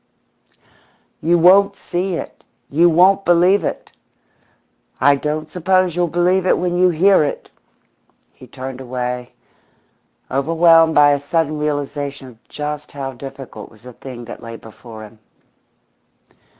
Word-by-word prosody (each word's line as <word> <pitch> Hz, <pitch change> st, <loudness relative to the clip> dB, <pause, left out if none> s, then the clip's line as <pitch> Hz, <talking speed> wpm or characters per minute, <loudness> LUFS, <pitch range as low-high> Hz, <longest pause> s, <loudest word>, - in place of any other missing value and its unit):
"You 170 Hz, +2 st, +2 dB
won't 195 Hz, +4 st, +5 dB
see 180 Hz, 0 st, -3 dB
it! -, -, -8 dB, 0.3 s
You 170 Hz, +5 st, +4 dB
won't 185 Hz, +4 st, +4 dB
believe 180 Hz, +3 st, +3 dB
it! -, -, -5 dB, 1.1 s
I 145 Hz, 0 st, +4 dB
don't 150 Hz, +2 st, -4 dB
suppose 185 Hz, +1 st, 0 dB
you'll 175 Hz, 0 st, +1 dB
believe 180 Hz, +3 st, +1 dB
it -, -, +3 dB
when 175 Hz, -1 st, -2 dB
you 180 Hz, +1 st, +3 dB
hear 180 Hz, +1 st, +3 dB
it!" 145 Hz, -, -5 dB, 0.8 s
He 130 Hz, -, -16 dB
turned 130 Hz, +1 st, -8 dB
away, 125 Hz, -1 st, -5 dB, 1.0 s
overwhelmed 165 Hz, +3 st, +3 dB
by 145 Hz, 0 st, +6 dB
a 145 Hz, -, +1 dB
sudden 155 Hz, +1 st, -2 dB
realisation 145 Hz, -2 st, -4 dB
of 115 Hz, -2 st, -20 dB
just 150 Hz, 0 st, -6 dB
how 135 Hz, -2 st, -5 dB
difficult 135 Hz, +1 st, -10 dB
was 110 Hz, 0 st, -22 dB
the 125 Hz, 0 st, -12 dB
thing 120 Hz, -1 st, -10 dB
that 120 Hz, -, -10 dB
lay 115 Hz, 0 st, -9 dB
before 110 Hz, 0 st, -12 dB
him. 110 Hz, +1 st, -15 dB
150 Hz, 135 wpm, -18 LUFS, 135-175 Hz, 1.1 s, by